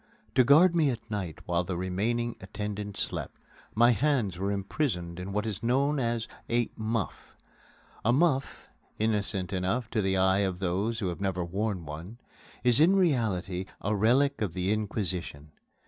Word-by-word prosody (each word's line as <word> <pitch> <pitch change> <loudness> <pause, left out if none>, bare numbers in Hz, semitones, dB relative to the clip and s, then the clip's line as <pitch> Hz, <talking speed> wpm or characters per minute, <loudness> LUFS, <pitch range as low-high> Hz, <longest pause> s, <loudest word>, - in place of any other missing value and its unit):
To 130 - +5
guard 165 +7 +6
me 155 -4 +4
at 115 -2 -5
night 95 -6 -4
while 85 0 +1
the 90 0 -3
remaining 110 +6 -1
attendant 105 +1 -5
slept, - - -4 0.4
my 120 +2 +6
hands 120 -9 +1
were 100 +1 0
imprisoned 95 - -2
in 90 +2 -5
what 105 +2 -1
is 105 -4 -4
known 135 +5 +2
as 115 -2 -1 0.2
a 120 0 +1
"muff." 110 -1 -3 0.7
A 120 - +3
muff, 140 0 +1 0.3
innocent 105 -4 -1
enough 95 +5 -1
to 110 - +1
the 95 -1 +1
eyes 95 +1 +3
of 90 -2 -3
those 100 +5 -1
who 95 - 0
have 90 +2 -6
never 90 -3 -1
worn 95 0 -2
one, 80 +9 -8 0.5
is 120 0 +5
in 170 +6 +6
reality 105 - +1
a 105 +2 -1
relic 130 +7 +3
of 100 -6 -1
the 95 +3 0
Inquisition. 95 -8 -3
105 Hz, 165 wpm, -29 LUFS, 95-120 Hz, 0.7 s, guard